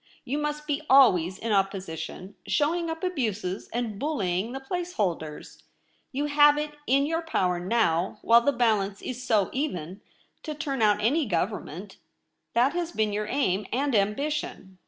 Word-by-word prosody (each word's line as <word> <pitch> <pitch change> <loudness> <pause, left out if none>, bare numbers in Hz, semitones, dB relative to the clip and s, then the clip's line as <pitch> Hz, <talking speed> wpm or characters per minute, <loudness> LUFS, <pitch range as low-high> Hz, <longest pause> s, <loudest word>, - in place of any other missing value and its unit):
You 280 +4 -2
must 300 0 -3
be 295 0 -1
always 190 -10 +5
in 230 - -3
opposition, 190 -2 -2
showing 330 +3 +1
up 325 +1 -5
abuses 220 - -2
and 230 -4 -3
bullying 215 - -1
the 265 - -5
place 355 +6 -4
holders. 165 -7 -3 0.5
You 285 +1 -1
have 295 0 +5
it 300 0 -2 0.2
in 275 +2 +3
your 325 +2 -1
power 180 - 0
now, 180 -3 +1
while 235 +1 +6
the 285 - +2
balance 215 -6 0
is 255 0 -5
so 215 -7 +2
even, 190 - -3 0.4
to 305 -2 -5
turn 280 -5 -3
out 210 -1 +3
any 280 +5 +2
Government. 190 0 -3 0.6
That 250 +4 +3
has 345 -1 -2
been 215 -7 0
your 210 +1 -2
aim 210 -7 0
and 275 +2 0
ambition. 210 -3 -1
235 Hz, 155 wpm, -27 LUFS, 195-290 Hz, 0.6 s, while